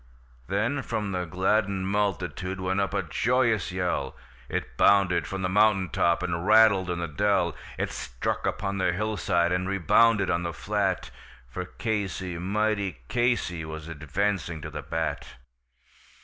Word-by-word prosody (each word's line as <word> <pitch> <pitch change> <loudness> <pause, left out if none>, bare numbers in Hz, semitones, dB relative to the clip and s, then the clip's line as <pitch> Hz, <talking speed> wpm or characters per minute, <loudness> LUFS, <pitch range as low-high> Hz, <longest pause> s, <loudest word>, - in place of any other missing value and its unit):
Then 110 - 0
from 105 -5 -3
the 90 -1 -2
gladdened 95 +2 0
multitude 95 -3 -1
went 95 +1 0
up 100 - -1
a 100 -1 -1
joyous 115 - +1
yell, 90 -1 -2 0.3
It - - -4
bounded 90 -5 +4
from 95 +2 -4
the - - +2
mountain 100 -1 +3
top, 85 +3 +1
and 85 -2 -2
rattled 105 -4 +6
in 90 - -1
the 85 0 -2
dell, 95 0 +1 0.2
It - - -2
struck - - -3
upon 100 0 -2
the 95 - +2
hillside, 95 -4 0
and 90 +1 0
rebounded 100 +3 +3
on 85 - +1
the 85 -1 -3
flat; 100 +2 -1 0.4
For 75 +9 -5
Casey, 95 -5 -3
mighty 100 +1 0
Casey, 120 -9 0
was 80 0 -7
advancing 85 +2 -2
to 75 - -7
the 75 -1 -5
bat. 80 +2 -3
95 Hz, 150 wpm, -27 LUFS, 85-105 Hz, 0.4 s, rattled